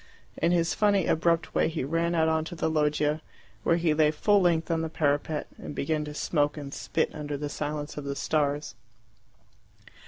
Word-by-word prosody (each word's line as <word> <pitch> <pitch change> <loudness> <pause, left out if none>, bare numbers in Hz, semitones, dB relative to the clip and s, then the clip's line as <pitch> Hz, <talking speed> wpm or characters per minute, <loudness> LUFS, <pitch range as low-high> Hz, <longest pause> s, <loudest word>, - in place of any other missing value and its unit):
In 170 - +2
his 170 -1 +2
funny 200 -4 +3
abrupt 170 0 +1
way - - +3
he 160 -3 -3
ran 165 +4 0
out 160 -1 +3
on 160 0 +2
to 175 - -7
the 160 -1 -1
loggia, 150 0 +1 0.4
where 165 - +3
he 170 -2 +2
lay 150 0 +4
full 200 +7 +3
length 170 -2 +2
on 165 -1 +1
the 160 - -2
parapet, 150 0 0
and 145 - -7
began 155 +1 -1
to 150 0 -7
smoke 145 -1 0
and 140 -2 -7
spit - - -1
under 145 -1 -4
the 145 +1 -4
silence 145 0 -4
of 145 - -5
the 140 0 -3
stars. 145 -1 0
155 Hz, 190 wpm, -27 LUFS, 150-165 Hz, 0.4 s, lay